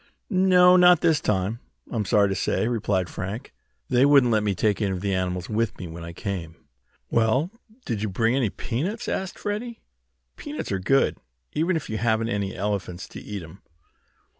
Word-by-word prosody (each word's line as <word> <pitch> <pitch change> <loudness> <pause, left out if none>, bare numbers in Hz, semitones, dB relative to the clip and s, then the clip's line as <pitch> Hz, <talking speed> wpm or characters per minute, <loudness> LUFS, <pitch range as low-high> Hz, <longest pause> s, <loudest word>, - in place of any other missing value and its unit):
"No, 185 -1 +6
not 180 -2 +6
this 160 -3 +3
time, 105 +3 0 0.3
I'm 110 -3 -1
sorry 100 +2 +4
to - - 0
say," 110 - 0
replied 100 -6 0
Frank. 100 +9 -6 0.3
"They 125 0 +3
wouldn't 140 -4 +5
let 110 -1 +3
me 105 -2 0
take 105 +2 +1
any 100 - +1
of 95 -2 -3
the 100 -1 -1
animals 90 0 -2
with 110 0 -1
me 90 - -6
when 85 0 -8
I 85 - -7
came 85 -2 -5
away." - - -33 0.5
"Well, 115 - +2 0.3
did 110 -5 -2
you 110 - -1
bring 115 +5 +1
any 130 -2 +2
any - - -2
peanuts?" 195 - -3
asked 190 -1 -3
Freddie. 225 +3 -4 0.6
"Peanuts 295 - -6
are 95 - 0
good, 135 +9 +2 0.4
even 170 +4 +1
if 160 - -3
you 110 - -3
haven't 115 -1 +1
any 100 -3 -2
elephants 95 -2 -3
to - - -9
eat 100 -3 -6
'em." 80 +5 -13
110 Hz, 190 wpm, -25 LUFS, 95-145 Hz, 0.6 s, No